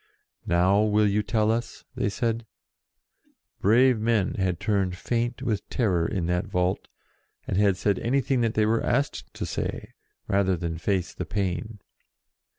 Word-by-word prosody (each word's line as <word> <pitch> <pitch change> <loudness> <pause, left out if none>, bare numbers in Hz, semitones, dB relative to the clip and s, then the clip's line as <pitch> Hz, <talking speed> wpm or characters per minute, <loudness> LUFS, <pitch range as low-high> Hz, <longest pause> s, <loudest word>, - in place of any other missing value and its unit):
"Now 95 +4 +3
will 105 0 +3
you 100 +1 +2
tell 110 0 +1
us?" 115 +1 -4
they - - -1
said. 115 +2 -2 1.1
Brave 120 +3 +4
men 110 -3 +1
had 95 -3 -1
turned 100 -3 0
faint 120 +4 -2
with 110 -5 -2
terror 90 -9 +1
in 95 -6 -2
that 90 +1 -1
vault, 90 +1 -1 0.6
and - - -1
had 100 -1 +3
said 100 +1 +1
anything 130 +1 +1
that 115 -1 0
they 110 - +3
were 115 +1 +2
asked 135 +4 -1
to - - -3
say, - - -4 0.3
rather 95 -2 +2
than 80 -1 -4
face 95 +1 -1
the - - -5
pain. 100 +1 -3
105 Hz, 155 wpm, -26 LUFS, 95-115 Hz, 1.1 s, Brave